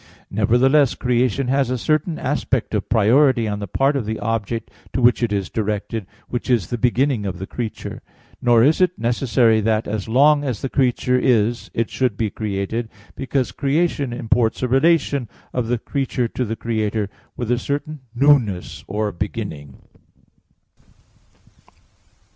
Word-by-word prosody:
Nevertheless 125 +7 +3
creation 125 +1 0
has 135 -1 +2
a 130 - 0
certain 155 +5 0
aspect - - -1
of - - -2
priority 120 +2 +4
on 105 -1 -2
the 100 - -5
part 135 +10 +1
of 125 -6 -2
the 110 0 -2
object 115 +1 -3 0.2
to - - 0
which 120 0 +4
it 120 -3 0
is 100 -2 -1
directed, 105 -1 -3 0.2
which 120 +1 -4
is 115 -9 +1
the 120 - -1
beginning 125 -1 +1
of 95 -2 -4
the 95 - -5
creature. 115 +1 -6 0.4
Nor 120 -2 +5
is 155 +7 +3
it 180 0 +2
necessary 115 -1 +2
that 110 +1 0
as 105 0 -3
long 145 +5 +4
as 125 -7 -3
the 135 - -1
creature 125 -1 +1
is 120 -2 +1
it 115 -1 -1
should 125 -6 0
be 110 -3 -1
created; 110 +2 -3 0.3
because 135 -1 -1
creation 145 -1 0
imports 120 0 0
a - - +2
relation 140 -2 +2 0.2
of 125 -3 -1
the 120 +1 +1
creature 130 0 -2
to 125 - -2
the 115 0 -3
Creator, 110 -2 -1 0.3
with 120 -1 -2
a 120 - +2
certain 145 +3 -3 0.2
newness 110 - +2
or 105 +1 -1
beginning. 70 -5 -6
120 Hz, 155 wpm, -21 LUFS, 110-135 Hz, 0.4 s, Nor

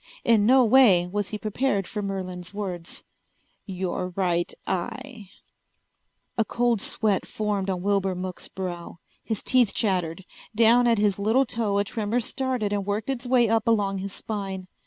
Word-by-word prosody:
In 215 -3 +4
no 260 0 +6
way 220 -7 +6
was 200 +2 -2
he 210 - -4
prepared 215 -1 -1
for 210 +3 -4
Merlin's 185 -2 -5
words. 180 -5 -5 0.6
"Your 185 -1 -3
right 175 -3 0
eye." 215 +4 -4 1.1
A - - +5
cold 235 -1 0
sweat 210 -3 0
formed 205 -2 -2
on 180 -2 -2
Wilbur 195 -2 +1
Mook's 180 0 -5
brow. 175 -3 -6 0.3
His 220 -3 -3
teeth 250 -5 +3
chattered. 180 -4 -1 0.3
Down 235 +2 +5
at 230 -1 +3
his 205 -1 +1
little 225 +7 +3
toe 220 -4 -1
a 200 - +3
tremor 215 +2 -1
started 245 -3 -2
and 200 -1 0
worked 205 +5 -2
its 250 -1 -5
way 245 -2 +4
up 225 0 +1
along 200 -4 +2
his 195 +1 -5
spine. 195 -3 -5
205 Hz, 155 wpm, -25 LUFS, 190-230 Hz, 1.1 s, no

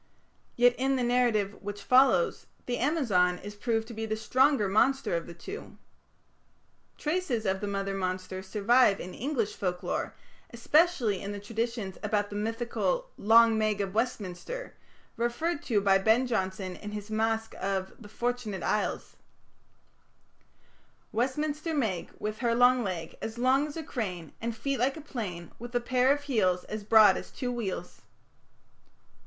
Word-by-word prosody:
Yet, 245 0 +5
in 270 +1 +2
the 255 - 0
narrative 240 -5 +1
which 205 0 -6
follows 265 - +4 0.2
the 245 -1 -2
Amazon 225 - +2
is 205 +3 -8
proved 225 +1 -1
to - - -7
be 220 0 -4
the 220 - -1
stronger 260 0 +3
monster 265 +3 +2
of 170 - -3
the 170 - -9
two. 395 - -9 1.2
Traces 300 -8 -1
of 190 +1 0
the 205 - -2
mother 195 0 -2
monster 185 0 -3
survive 210 +2 +3
in 180 - -7
English 245 -5 -2
folklore, 180 -2 -3 0.3
especially 240 - +2
in 200 +1 -4
the 205 - -5
traditions 225 -1 -3
about 205 -1 -1
the - - -5
mythical 240 - -1
"Long 225 +1 +5
Meg 215 -1 +1
of 195 -1 -2
Westminster", 230 - -3 0.4
referred 265 +8 -1
to 220 -5 +2
by 195 -1 +4
Ben 225 +6 +3
Jonson 190 -5 -2
in 210 0 -8
his 210 +1 -6
masque 225 0 0
of 190 -1 -2
the 205 - -11
"Fortunate 235 -4 -3
Isles": 210 - -1 1.9
Westminster 300 +6 -1
Meg, 215 - -1
With 215 0 -4
her 235 -2 +1
long 245 +1 +5
leg, 175 -5 -5
As 225 +1 -5
long 260 +4 +3
as 300 - -8
a 320 - -4
crane; 185 - -5
And 230 0 -3
feet 275 +2 -2
like 265 +5 +1
a - - -7
plane, 195 - -6
With 240 +1 -8
a - - +4
pair 255 +2 +2
of 290 0 0
heels 195 -10 +1
As 215 -1 -6
broad 215 0 +6
as - - -7
two 250 -3 -4
wheels. 195 -7 -5
225 Hz, 155 wpm, -29 LUFS, 200-255 Hz, 1.9 s, broad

